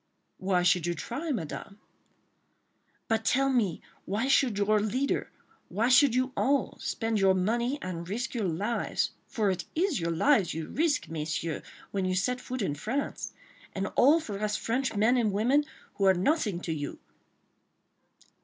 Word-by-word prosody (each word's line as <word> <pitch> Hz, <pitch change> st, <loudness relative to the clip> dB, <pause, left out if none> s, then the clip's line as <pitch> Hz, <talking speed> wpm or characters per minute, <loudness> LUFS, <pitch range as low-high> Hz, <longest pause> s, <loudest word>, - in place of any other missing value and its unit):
"Why 185 Hz, -2 st, +1 dB
should 175 Hz, -1 st, +3 dB
you 175 Hz, -, 0 dB
try, 275 Hz, -, -4 dB
Madame?" 200 Hz, -, -5 dB, 1.3 s
"But, 225 Hz, -1 st, +1 dB
tell 270 Hz, +3 st, +2 dB
me, 205 Hz, -10 st, 0 dB, 0.2 s
why 215 Hz, +7 st, -1 dB
should 260 Hz, -5 st, +3 dB
your 210 Hz, +1 st, +3 dB
leader—why 235 Hz, 0 st, -2 dB
should 260 Hz, -1 st, +6 dB
you 255 Hz, +1 st, +1 dB
all—spend 230 Hz, -4 st, 0 dB
your 190 Hz, -1 st, +4 dB
money 235 Hz, +8 st, 0 dB
and 175 Hz, -1 st, -5 dB
risk 240 Hz, +6 st, -3 dB
your 225 Hz, -6 st, -1 dB
lives—for 205 Hz, +2 st, -1 dB
it 185 Hz, -1 st, -3 dB
is 340 Hz, -, +1 dB
your 170 Hz, 0 st, -1 dB
lives 190 Hz, -, +3 dB
you 160 Hz, -1 st, -4 dB
risk, 310 Hz, -1 st, +1 dB
Messieurs, 160 Hz, 0 st, -3 dB, 0.3 s
when 195 Hz, -2 st, -1 dB
you 185 Hz, 0 st, 0 dB
set 250 Hz, +6 st, 0 dB
foot 255 Hz, -3 st, -4 dB
in 165 Hz, -, 0 dB
France—and 210 Hz, -, -5 dB
all 295 Hz, +6 st, +6 dB
for 210 Hz, -10 st, -6 dB
us 210 Hz, 0 st, 0 dB
French 250 Hz, +1 st, -1 dB
men 220 Hz, +5 st, +3 dB
and 225 Hz, -4 st, +2 dB
women, 250 Hz, +9 st, +2 dB, 0.3 s
who 195 Hz, -, 0 dB
are 190 Hz, -1 st, +6 dB
nothing 205 Hz, -, +1 dB
to 165 Hz, -, -2 dB
you?" 145 Hz, -2 st, -5 dB
215 Hz, 150 wpm, -29 LUFS, 185-255 Hz, 1.3 s, should